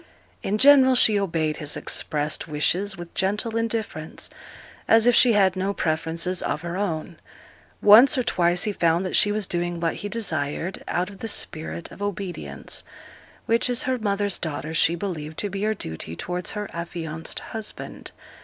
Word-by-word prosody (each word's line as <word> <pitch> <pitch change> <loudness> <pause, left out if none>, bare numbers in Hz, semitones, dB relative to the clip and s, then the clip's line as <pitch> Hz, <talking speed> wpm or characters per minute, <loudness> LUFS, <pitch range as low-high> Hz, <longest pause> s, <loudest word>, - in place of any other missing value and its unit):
In 205 - -1
general 265 0 +7
she 215 -4 +4
obeyed 165 -5 -1
his 150 -2 -2
expressed 150 +1 -2
wishes 180 +6 0
with 175 -1 -9
gentle 210 +4 -1
indifference, 225 -8 -3 0.6
as 225 0 +5
if 245 - +6
she 235 0 +6
had 195 -3 +4
no 195 +2 -1
preferences 165 +3 -1
of - - -2
her 170 0 -5
own; 170 -4 -3 0.7
once 235 +8 +8
or 255 - +2
twice 175 -4 +2
he 210 - 0
found 170 0 +2
that 185 - -2
she 205 - +4
was 210 -1 -1
doing 175 -1 -2
what 165 -1 -1
he 205 - -5
desired 175 -5 -2
out 180 +3 -1
of 195 - -13
the 225 - -4
spirit 160 -4 -3
of - - -12
obedience, 180 - -4 0.6
which, 230 +2 +2
as 245 -1 +1
her 255 -1 -1
mother's 205 -2 -1
daughter, 155 -1 -4
she 165 +1 +3
believed 160 -4 -5
to 205 - -2
be 195 +1 -4
her 215 +1 +1
duty 80 - -6
towards 180 - -4
her 210 -1 -4
affianced 165 -2 -4
husband. 220 -1 -7
185 Hz, 170 wpm, -24 LUFS, 165-210 Hz, 0.7 s, once